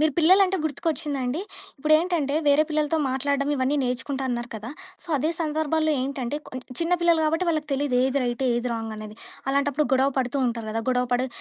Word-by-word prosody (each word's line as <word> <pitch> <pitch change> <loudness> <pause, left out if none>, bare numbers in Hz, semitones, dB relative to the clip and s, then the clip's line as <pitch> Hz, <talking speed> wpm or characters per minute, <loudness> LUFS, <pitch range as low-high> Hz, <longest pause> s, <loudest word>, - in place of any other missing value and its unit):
మీరు 310 -1 +3
పిల్లలంటే 380 +3 +5
గుర్తుకొచ్చిందండి. 295 -2 -2 0.4
ఇప్పుడేంటంటే 310 -1 +2
వేరే 290 +2 +5
పిల్లలతో 305 +1 0
మాట్లాడడం 280 +2 0
ఇవన్నీ 260 +3 +1
నేర్చుకుంటా 260 +2 -2
అన్నారు 240 0 -2
కదా! 220 +3 -6 0.3
సో, - - -16
అదే 310 +5 +1
సందర్భాల్లో 315 0 +1
ఏంటంటే 270 0 -3
కొ - - -14 0.3
చిన్న 335 +2 0
పిల్లలు 340 -2 +4
గాబట్టి 325 +4 +1
వాళ్ళకి 310 -2 0
తెలీదు. 275 -2 0
ఏది 275 +1 0
రైటు 240 +2 -1
ఏది 240 +1 -1
రాంగనేది. 215 -1 -6 0.3
అలాంటప్పుడు 280 +2 +1
గొడవ 265 +1 +4
పడుతూ 255 +2 -1
ఉంటారు 230 -2 -3
గదా! 225 +1 -2
గొడవపడి 250 0 +1
280 Hz, 165 wpm, -25 LUFS, 250-310 Hz, 0.4 s, పిల్లలంటే